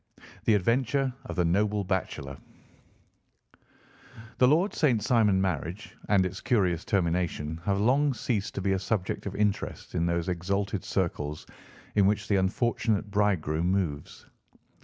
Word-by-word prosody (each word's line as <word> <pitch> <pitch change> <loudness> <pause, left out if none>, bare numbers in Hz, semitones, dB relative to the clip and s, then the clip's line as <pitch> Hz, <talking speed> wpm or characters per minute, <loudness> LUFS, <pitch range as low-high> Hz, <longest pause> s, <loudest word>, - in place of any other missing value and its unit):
THE 110 - +5
ADVENTURE 125 +6 +1
OF - - -6
THE 90 - +2
NOBLE 100 +4 +1
BACHELOR 90 -7 -3 2.0
The 125 - +6
Lord 170 +9 +3
St. 130 -8 +2
Simon 110 -6 +3
marriage, 90 +1 -3
and 95 -3 +4
its 90 - -5
curious 90 -8 +1
termination, 85 -4 -1
have 100 -1 +1
long 135 +5 +3
ceased 105 -6 -2
to - - -2
be 95 +1 0
a 95 - +1
subject 100 -1 -2
of 100 - -5
interest 105 -1 -2
in 85 -1 0
those 85 0 -1
exalted 95 +2 -2
circles 75 -5 -2 0.5
in 100 -2 +4
which 105 0 0
the 100 - +2
unfortunate 105 +1 0
bridegroom 90 -5 +1
moves. 85 -7 -2
100 Hz, 140 wpm, -28 LUFS, 90-110 Hz, 2.0 s, The